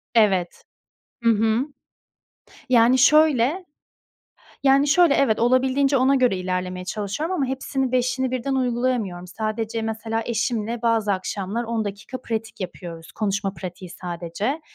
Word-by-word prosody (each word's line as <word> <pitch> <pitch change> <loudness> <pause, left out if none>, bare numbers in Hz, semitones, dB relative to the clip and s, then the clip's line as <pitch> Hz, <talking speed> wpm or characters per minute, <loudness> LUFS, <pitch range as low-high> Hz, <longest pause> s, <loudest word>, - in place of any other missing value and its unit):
Evet. 190 -6 +2 0.6
Hı 230 - +5
hı. 220 0 +2 1.1
Yani 245 +1 +5
şöyle, 305 +3 +4 1.0
yani 275 +1 +4
şöyle, 330 +1 +5
evet 245 -7 +2
olabildiğince 260 +3 +3
ona 265 +2 +4
göre 250 -7 +2
ilerlemeye 185 0 -3
çalışıyorum 215 - -3
ama 280 - 0
hepsini, 265 0 -2
beşini 255 +1 0
birden 255 +2 -1
uygulayamıyorum. 240 -8 -1
Sadece, 220 +3 -3
mesela, 225 0 -2
eşimle 230 0 -2
bazı 225 -3 +2
akşamlar 195 +4 -3
10 225 -2 -2
dakika 205 +6 -6
pratik 225 -1 -4
yapıyoruz. 170 -3 -7
Konuşma 200 -2 -2
pratiği 185 -1 -8
sadece. 175 - -4
230 Hz, 120 wpm, -23 LUFS, 200-260 Hz, 1.1 s, Hı